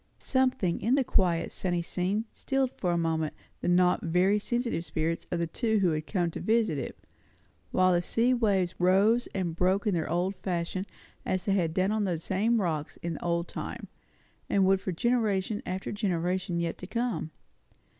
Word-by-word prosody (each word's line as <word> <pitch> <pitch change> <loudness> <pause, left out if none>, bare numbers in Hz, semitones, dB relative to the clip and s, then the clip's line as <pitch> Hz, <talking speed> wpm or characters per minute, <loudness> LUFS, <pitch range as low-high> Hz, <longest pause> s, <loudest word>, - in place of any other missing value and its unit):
Something 255 -10 +1
in 235 +6 +3
the 275 - +3
quiet, 175 -7 +1
sunny 175 -2 -1
scene 190 +5 -1
stilled 270 -1 0
for 180 - -1
a 170 - +1
moment 160 -2 0 0.2
the - - -3
not 180 0 +4
very 180 +5 +2
sensitive 235 -5 -1
spirits 165 0 -2
of 175 - -1
the 170 - 0
two 220 +6 0
who 190 -3 +3
had 155 0 -3
come 175 -4 0
to - - -6
visit 220 -9 +1
it; - - -5 0.7
while 185 0 +3
the 175 - +3
sea 235 +8 +2
waves 195 -7 +1
rose 200 +7 +4
and 175 -4 -1
broke 185 +4 +1
in 210 - +2
their 165 -2 -1
old 180 +4 0
fashion, 185 +1 -3 0.4
as 185 -1 -1
they 200 - +2
had 170 -4 0
done 190 +2 +2
on 215 -1 +1
those 170 -4 -2
same 220 +5 +1
rocks 160 -6 -2
in 165 -2 -3
old 170 0 0
time, - - -6 0.6
and 195 -1 +3
would 195 +1 +5
do - - -21
for 190 - 0
generation 210 0 0
after 185 +1 -3
generation 180 -3 -1
yet 170 -1 -2
to 185 - -7
come. 235 -7 -2
185 Hz, 185 wpm, -29 LUFS, 170-210 Hz, 0.7 s, would